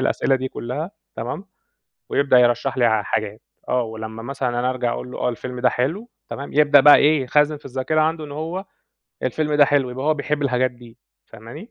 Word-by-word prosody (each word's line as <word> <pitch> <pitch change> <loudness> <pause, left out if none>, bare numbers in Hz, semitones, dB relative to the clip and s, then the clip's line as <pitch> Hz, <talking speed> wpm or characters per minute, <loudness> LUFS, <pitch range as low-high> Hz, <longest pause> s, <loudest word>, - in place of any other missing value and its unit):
الأسئلة 135 +1 +1
دي 130 0 -4
كُلّها 140 +10 -5 0.3
تمام، 125 - -5 0.6
ويبدأ 140 -3 +3
يرشّح 120 +2 +2
لي 120 - +3
ع 110 -2 +3
حاجات، 110 +1 -3 0.3
آه، 125 -1 +1
ولمّا 110 0 -7
مثلًا 135 0 -3
أنا 120 +1 0
أرجع 125 -2 -1
أقول 125 - -6
له - - -8
آه - - 0
الفيلم 125 +1 -5
ده 125 - +4
حلو 165 - -2 0.2
تمام، 140 +1 -7
يبدأ 145 -1 +6
بقى 145 +1 +8
إيه، 150 -1 +3
يخزّن 150 +3 +2
في 145 - -19
الذاكرة 135 +4 -1
عنده 155 0 0
إن 145 - -9
هو 165 +6 -4 0.6
الفيلم 150 +4 -1
ده 145 - +6
حلو 140 -3 +1
يبقى 130 +3 -5
هو 155 - +3
بيحب 150 0 -2
الحاجات 130 -2 +1
دي 120 -2 -16 0.3
فاهماني، 115 - -11
130 Hz, 200 wpm, -21 LUFS, 120-150 Hz, 0.6 s, بقى